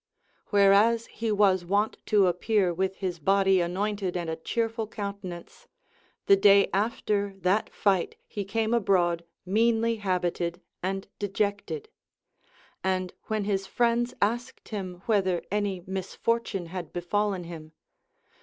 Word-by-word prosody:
Whereas 205 +3 +4
he 225 -1 -3
was 200 -3 +3
wont 200 +5 0
to 205 -2 +4
appear 180 +1 +1
with 190 +2 -1
his 185 -3 -3
body 195 +3 +3
anointed 190 +1 -1
and 170 -2 -3
a - - -2
cheerful 225 +6 -2
countenance, 200 -5 -7 0.6
the 200 - +7
day 200 0 +5
after 205 -1 0
that 185 +5 +2
fight 195 -4 +1
he 205 - -4
came 220 +3 -1
abroad 180 -6 +2 0.2
meanly 225 +3 +2
habited 180 -3 -1 0.2
and 195 +1 -3
dejected; 205 - -2 1.0
and 185 -1 -1
when 215 -1 -1
his 195 -1 -1
friends 240 +3 +1
asked 240 +4 -2
him 185 -4 -5
Avhether 190 -5 +1
any 200 -3 -1
misfortune 195 +1 -2
had 180 -2 -5
befallen 190 +2 -1
him. 160 -2 -9
195 Hz, 125 wpm, -27 LUFS, 185-215 Hz, 1.0 s, the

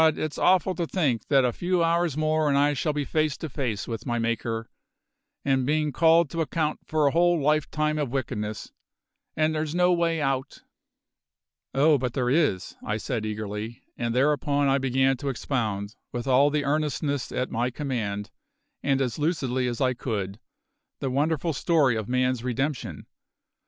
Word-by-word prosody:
it's 155 -2 -4
awful 185 0 +3
to 170 -2 -2
think 140 - 0
that 135 -3 +4
a 120 - +1
few 175 +3 0
hours 165 -3 +1
more 155 0 +2
and 140 - +3
I 145 +1 +3
shall 145 +3 0
be 145 -1 -2
face 155 -1 0
to 160 - -5
face 125 -7 -3
with 115 +2 -5
my 120 -1 0
Maker, 115 0 -2 0.8
and 135 -2 +2
bein' 150 +2 +1
called 165 +3 +4
to 165 - -1
account 155 -1 -1
for 155 -1 +1
a 140 - +4
whole 175 +1 +3
lifetime 155 +1 +1
of 145 -4 -1
wickedness. 110 -5 -4 0.7
And 155 0 +2
there's 155 +1 -2
no 180 0 +4
way 170 -1 +1
out!" 135 -2 -2 1.1
"Oh, 145 +1 +4
but 125 -2 -2
there 125 -2 0
is," 140 - +1
I 105 - -1
said 110 -1 -3
eagerly, 110 +2 -5
and 120 0 -2
thereupon 145 +1 +2
I 135 +1 +3
began 135 0 +2
to 140 - -3
expound, 110 -6 -2 0.2
with 120 0 -4
all 135 +2 +5
the 145 -1 -1
earnestness 145 -1 -1
at 125 - -2
my 120 +2 0
command, 110 -7 -3 0.5
and 135 -1 +1
as 130 +2 -2
lucidly 135 -5 0
as 120 -1 -3
I 130 -1 +3
could, 105 -5 -4 0.6
the 135 - -3
wonderful 155 +4 0
story 145 -4 +2
of 110 0 -4
man's 125 -1 +1
redemption. 135 +3 -3
135 Hz, 170 wpm, -26 LUFS, 120-155 Hz, 1.1 s, all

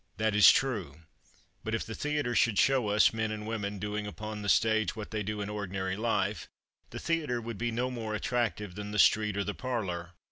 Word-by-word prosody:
That 110 0 +1
is 105 -1 +8
true; 95 - -1 0.6
but 110 0 -1
if 115 - -3
the 115 - -6
theatre 145 -1 -1
should 115 -3 +3
show 130 -2 +3
us 105 +2 +4
men 110 0 -1
and 105 0 -5
women 105 -2 -3
doing 105 +1 -3
upon 105 0 -6
the 100 - -2
stage 110 -3 +3
what 110 -2 -7
they 110 -1 -2
do 105 +1 -3
in 100 - -3
ordinary 95 -2 -3
life, 115 +3 -1 0.4
the - - -8
theatre 155 -7 -1
would 115 -2 -6
be 120 +1 0
no 125 +2 -1
more 110 -3 -4
attractive 110 -3 -1
than 105 +2 -6
the 105 - -3
street 105 +1 +4
or 100 - +1
the 105 - -3
parlor. 95 -10 -4
110 Hz, 210 wpm, -30 LUFS, 105-115 Hz, 0.6 s, is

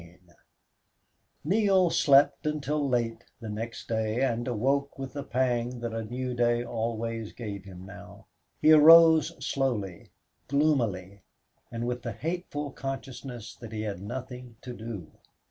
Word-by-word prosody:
16 85 +1 -19 1.1
Neale 190 0 +3
slept 140 +1 +4
until 150 -1 -1
late 115 -2 -1 0.2
the 115 - -8
next 115 +2 -6
day 110 +2 0
and 120 -1 -1
awoke 135 +5 0
with 135 -1 -6
the 145 - -4
pang 125 0 -1
that 120 -1 -4
a 115 0 -3
new 125 +3 -4
day 120 0 +1
always 115 -1 -3
gave 105 -4 -7
him 95 -1 -11
now. 95 - -12 0.3
He 155 - +5
arose 160 +1 +8
slowly, 110 -12 -2 0.4
gloomily, 115 -10 0 0.5
with 120 +1 -3
the 115 -2 -5
hateful 150 - -4
consciousness 135 -4 -7
that 115 -3 -10
he 110 0 -3
had 100 -4 -4
nothing 125 +2 -7
to 125 - -6
do. 110 -8 -8
120 Hz, 135 wpm, -28 LUFS, 110-140 Hz, 1.1 s, arose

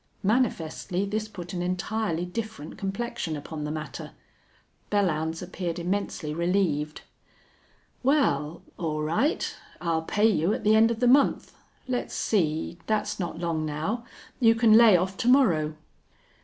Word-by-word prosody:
Manifestly 195 -4 0
this 215 +2 -2
put 180 -5 -8
an 175 - -2
entirely 180 0 -1
different 220 -4 -6
complexion 195 -4 -3
upon 150 +1 -6
the - - -3
matter. 155 0 -6 0.8
Belllounds 165 -5 0
appeared 180 -1 -4
immensely 175 -3 -2
relieved. 170 -3 0 1.0
"Wal, 170 - +1 0.2
all 155 -3 -2
right. 215 - 0 0.2
I'll 165 -2 0
pay 205 +6 +1
you 200 -2 +2
at - - -6
the 215 - +4
end 220 +1 +6
of 230 0 -3
the 245 - +4
month. 275 +3 +3 0.3
Let's 250 -1 -2
see, 170 -3 0
thet's 215 -1 -1
not 175 -3 -3
long 165 -2 -1
now. 155 +10 -2 0.4
You 230 -3 +5
can 225 -1 +5
lay 220 -4 +8
off 190 +2 -2
to - - -2
morrow." 170 - +4
185 Hz, 140 wpm, -26 LUFS, 160-220 Hz, 1.0 s, lay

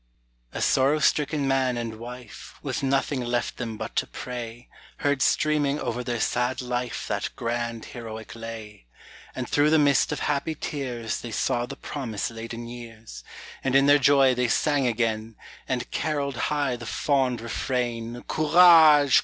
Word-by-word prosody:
A - - -3
sorrow 135 +3 +3
stricken 150 -1 +1
man 130 -2 +1
and 115 -2 -5
wife, 120 -1 -10
With - - -3
nothing 135 0 0
left 120 0 -2
them 115 -3 -5
but - - -6
to - - +1
pray, 120 -1 -7 0.3
Heard 145 -2 0
streaming 150 -1 +2
over 120 +1 -3
their 120 -1 -2
sad 125 +2 0
life 125 -2 -3
That - - -2
grand, 115 -1 -3
heroic 110 -2 -8
lay: 110 - -9 0.5
And - - -4
through 145 +1 +3
the 160 - +5
mist 145 -2 +3
of - - -3
happy 150 +2 -1
tears 125 -7 -4
They 120 - -6
saw 120 +2 -1
the - - -7
promise 120 -6 -4
laden 115 +1 -7
years; 115 -2 -10 0.4
And 135 0 0
in 135 0 +6
their 145 +1 +6
joy 135 -1 +5
they 125 0 0
sang 145 +1 +2
again, 110 -1 -1 0.3
And 125 -2 -2
carolled 145 -3 -1
high 145 -4 0
the 120 -1 -9
fond 130 -1 +1
refrain 120 0 -3
Courage! 155 -3 +6
125 Hz, 155 wpm, -25 LUFS, 115-140 Hz, 0.5 s, in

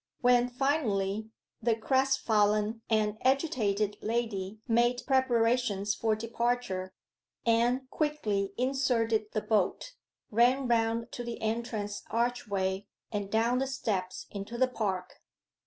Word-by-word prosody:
When, 245 -1 +4
finally, 220 -6 0 0.3
the 230 0 +2
crestfallen 225 -4 +2
and 215 -1 +1
agitated 230 -8 +1
lady 215 -3 -2
made 240 +1 +2
preparations 235 -5 +2
for 220 0 +1
departure, 230 -4 -2 0.5
Anne 240 +3 +2
quickly 215 -11 -1
inserted 245 -4 +1
the 215 - 0
bolt, 215 - 0 0.4
ran 245 +4 +3
round 230 0 +1
to 245 - -5
the 235 -1 -5
entrance 220 -2 -2
archway, 205 -5 -1 0.2
and 205 -2 -3
down 230 +4 +2
the 270 - 0
steps 200 -9 -3
into 200 +4 -6
the 260 +1 +4
park. 195 -7 -3
230 Hz, 110 wpm, -30 LUFS, 210-245 Hz, 0.5 s, When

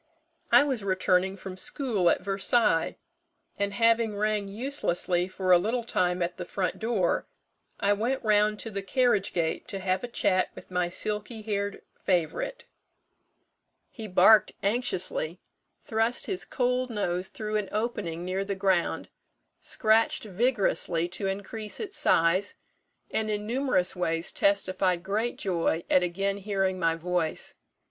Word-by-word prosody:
I - - +8
was 265 -7 -2
returning 185 0 +1
from 190 -1 -8
school 205 - 0
at - - +1
Versailles; 195 -2 +1 0.6
and 200 0 0
having 230 0 +2
rang 210 -1 0
uselessly 195 -6 -1
for 185 0 -1
a 175 - +8
little 230 +6 -1
time 180 -5 0
at 175 +1 -4
the 180 - -4
front 185 +1 -3
door, 220 -6 0 0.5
I 205 -1 +3
went 235 +6 -1
round 210 -1 +3
to 225 - -6
the 200 -1 -3
carriage 210 -1 +1
gate 165 -2 -1
to 195 - -4
have 190 +1 -1
a - - -2
chat 185 -5 +1
with - - -12
my 180 -1 0
silky 210 +4 -3
haired 200 -1 -3 0.2
favourite. 195 - -1 1.3
He 220 -3 -7
barked 195 +2 +6
anxiously, 190 -6 -1 0.5
thrust 225 +2 0
his 380 -2 -2
cold 250 0 0
nose 185 -4 -1
through 215 +2 -3
an 210 -2 -3
opening 205 -6 -2
near 185 +2 -1
the 200 0 -3
ground, 190 -3 0 0.5
scratched 220 0 +2
vigorously 200 -5 +1
to 195 +2 -3
increase 205 +2 -4
its 405 -3 -5
size, 185 +5 +2 0.6
and 220 0 -1
in 210 0 -2
numerous 235 -7 +1
ways 165 -1 0
testified 185 -3 +1
great 215 +5 -1
joy 170 -3 0
at 185 - +6
again 195 +3 -1
hearing 195 -2 -1
my 165 -2 +2
voice. 170 -1 -1
200 Hz, 140 wpm, -28 LUFS, 180-220 Hz, 1.3 s, I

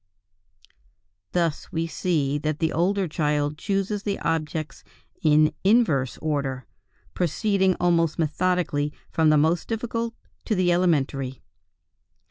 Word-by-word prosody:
Thus 170 -4 -1
we 165 0 -1
see 150 -4 0
that 150 0 -2
the 160 0 0
older 190 +3 +1
child 150 -1 -1
chooses 200 +1 -1
the 200 -1 -2
objects 155 -3 -2 0.4
in 155 0 +4
inverse 190 - +3
order, 135 -5 -2 0.5
proceeding 190 +2 +1
almost 170 -2 +2
methodically 165 -2 0 0.2
from 160 -2 +3
the 155 - +5
most 160 +3 +2
difficult 230 0 -3 0.3
to 215 - 0
the 180 -2 +2
elementary. 140 -7 0
165 Hz, 110 wpm, -25 LUFS, 150-185 Hz, 0.5 s, the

